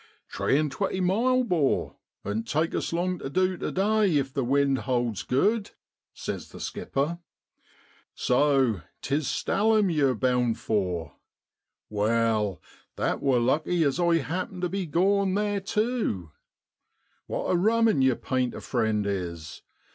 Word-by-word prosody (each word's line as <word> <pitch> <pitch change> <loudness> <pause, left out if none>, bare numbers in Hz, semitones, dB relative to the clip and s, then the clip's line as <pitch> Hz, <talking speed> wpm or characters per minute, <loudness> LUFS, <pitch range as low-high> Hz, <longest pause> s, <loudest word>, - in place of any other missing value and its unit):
' - - -48
Tree 135 - +1
and 150 -1 0
twenty 190 +5 -2
miles, 240 +8 +2
'bor, 165 - 0 0.3
oan't 110 +3 -3
take 155 +5 0
us - - -2
long 180 +1 -1
tu - - -5
du 185 +5 +1
tu - - -4
day 200 -3 +2
if 135 -1 -1
the 140 -3 0
wind 135 +1 +2
holds 120 -5 -1
good,' 205 - +1 0.4
says - - -6
the - - -11
skipper. 155 +5 -2 0.5
' - - -31 0.2
So 130 - +2 0.2
'tis 145 +1 0
Stalham 210 -2 +2
yew're 140 -4 +2
bound 125 -1 +1
for; 90 -6 -2 0.7
wal, 110 -2 +1 0.4
that - - -1
wor 130 -3 +3
lucky, 155 +8 +1
as 140 +2 0
I 170 -1 +3
happen 180 +4 -4
tu 180 - 0
be 190 -1 -3
goin' 190 +4 +2
theer 205 -1 0
tew. 210 - -1 1.0
What - - -2
a - - +3
rummen 220 -3 +3
yer 130 -2 +4
painter 130 -1 -2
friend 110 -4 0
is. 85 -6 -4
145 Hz, 145 wpm, -26 LUFS, 120-185 Hz, 1.0 s, yer